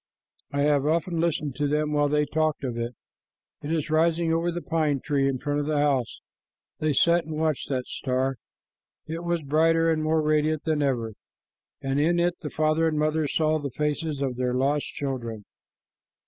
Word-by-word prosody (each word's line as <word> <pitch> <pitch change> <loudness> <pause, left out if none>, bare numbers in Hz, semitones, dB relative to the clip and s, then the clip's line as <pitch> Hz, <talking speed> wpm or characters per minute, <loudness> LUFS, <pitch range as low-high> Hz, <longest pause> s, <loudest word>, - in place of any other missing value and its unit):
"I 140 0 0
have 145 -1 +2
often 165 +2 0
listened 155 -4 0
to 145 - +1
them 150 +1 0
while 145 -1 +2
they 150 0 +2
talked 155 -1 0
of 125 -3 -2
it. 120 +1 -4 0.7
It 150 - -4
is 155 -2 -1
rising 165 +1 +2
over 170 +1 +1
the 175 0 -5
pine 155 -4 0
tree 140 -1 +1
in 135 - -1
front 145 +2 -1
of 145 - -2
the 155 -1 0
house." 140 -5 0 0.6
They 155 0 +1
sat 170 +4 +3
and 155 0 -5
watched 155 -3 -1
the 130 -2 -1
star. 130 0 -1 0.7
It 165 +2 -5
was 170 -2 -1
brighter 165 +3 +3
and 155 -1 0
more 155 0 +2
radiant 155 0 +1
than 155 -2 0
ever, 120 -6 0 0.7
and 135 +1 0
in 170 +3 +2
it 175 0 +2
the 150 - -4
father 155 +2 +1
and 155 -1 0
mother 155 0 +1
saw 155 +2 +1
the 145 -1 -4
faces 150 +1 -2
of 130 -3 -1
their 125 0 0
lost 140 +3 +1
children. 120 -7 -5
150 Hz, 190 wpm, -26 LUFS, 140-160 Hz, 0.7 s, sat